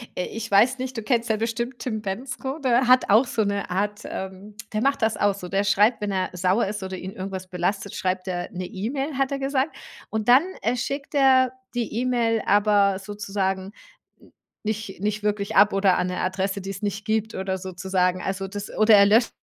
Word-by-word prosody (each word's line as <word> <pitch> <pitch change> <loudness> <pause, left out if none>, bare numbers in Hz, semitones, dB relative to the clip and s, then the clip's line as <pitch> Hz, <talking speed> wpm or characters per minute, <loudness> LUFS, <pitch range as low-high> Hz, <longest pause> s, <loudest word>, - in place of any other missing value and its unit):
äh, 180 - -2
ich 225 0 -6
weiß 245 +6 +4
nicht, 260 -1 -4
du 225 - -3
kennst 235 +1 0
ja 220 - +2
bestimmt 235 +3 -3
Tim 220 -4 -4
Bendzko, 260 +7 -4
der 255 -4 +2
hat 255 0 +5
auch 220 +6 +6
so 225 -2 0
'ne 200 -1 -2
Art, 205 +3 -1
ähm, 190 +2 -7 0.2
der 215 - 0
macht 275 0 +1
das 220 0 +2
auch 205 -1 +1
so. 180 -2 -8
Der 195 +2 0
schreibt 210 +3 +3
„wenn 205 - -1
er 185 -1 -1
sauer 185 +5 +1
ist 205 +1 -4
oder 190 0 -5
ihn 185 +1 -6
irgendwas 190 -1 -6
belastet, 195 +3 -2
schreibt 185 0 -2
er 175 -1 -3
'ne 180 0 -5
E-Mail“, 270 - -3
hat 270 +1 0
er 275 - -1
gesagt. 270 +2 -1 0.3
Und 220 -1 -3
dann, 255 +5 +7 0.2
äh, 235 +3 +1
schickt 275 +3 -4
er 260 -2 +5 0.2
die 240 -2 -2
E-Mail 235 -3 +1
aber 205 -1 +4
sozusagen 195 -1 -3 0.5
n - - -21 0.3
nicht 215 -2 -4
nicht 210 +1 -1
wirklich 205 -1 -1
ab 205 +1 +6
oder 195 -2 +3
an 180 - 0
'ne 180 0 -3
Adresse, 190 +2 -1
die 195 +1 -5
es 200 +1 -8
nicht 205 0 -3
gibt 220 0 -1
oder 190 0 -2
sozusagen. 185 0 -1
Also, 195 0 -3
das 205 +1 -6
oder 215 0 +6
er 200 0 +7
löscht 220 +4 +4
205 Hz, 210 wpm, -24 LUFS, 190-235 Hz, 0.5 s, dann